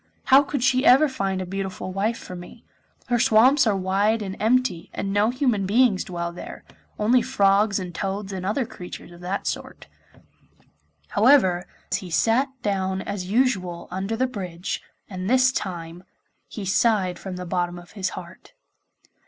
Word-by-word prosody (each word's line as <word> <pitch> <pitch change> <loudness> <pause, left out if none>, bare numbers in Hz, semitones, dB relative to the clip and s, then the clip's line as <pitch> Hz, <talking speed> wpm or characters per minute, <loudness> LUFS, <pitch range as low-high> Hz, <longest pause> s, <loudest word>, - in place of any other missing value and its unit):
How 265 +1 +7
could 280 -3 -3
she 260 -1 +3
ever 275 +5 +6
find 195 -8 -2
a - - -6
beautiful 190 0 -5
wife 215 +4 0
for 180 - -9
me? 175 0 -12 0.4
Her 240 -1 +2
swamps 260 +3 +5
are 205 -2 +2
wide 200 +4 +1
and 190 -1 -5
empty, 220 -6 +1
and 195 0 -2
no 205 +2 +3
human 245 -6 0
beings 220 -2 +3
dwell 170 -1 -4
there; 175 - -9 0.3
only 235 +4 +3
frogs 200 -4 +2
and 180 -3 -5
toads 195 +2 -4
and 185 -1 -5
other 215 +7 0
creatures 180 -3 -10
of 175 0 -14
that 185 +3 -3
sort.' - - -5 1.2
However, 200 -6 +4 0.3
he 185 -2 -5
sat 230 - +2 0.2
down 190 -2 -1
as 195 -3 -5
usual 195 -7 0
under 195 +4 -2
the 255 +3 +1
bridge, 185 -8 -5 0.3
and 185 0 -5
this 260 +1 +4
time 175 -6 -5 0.4
he 210 - -7
sighed 190 -2 +2
from 190 -2 -6
the 180 0 -6
bottom 175 0 -2
of 175 0 -13
his 190 -3 -2
heart. 180 - -11
195 Hz, 160 wpm, -24 LUFS, 185-235 Hz, 1.2 s, How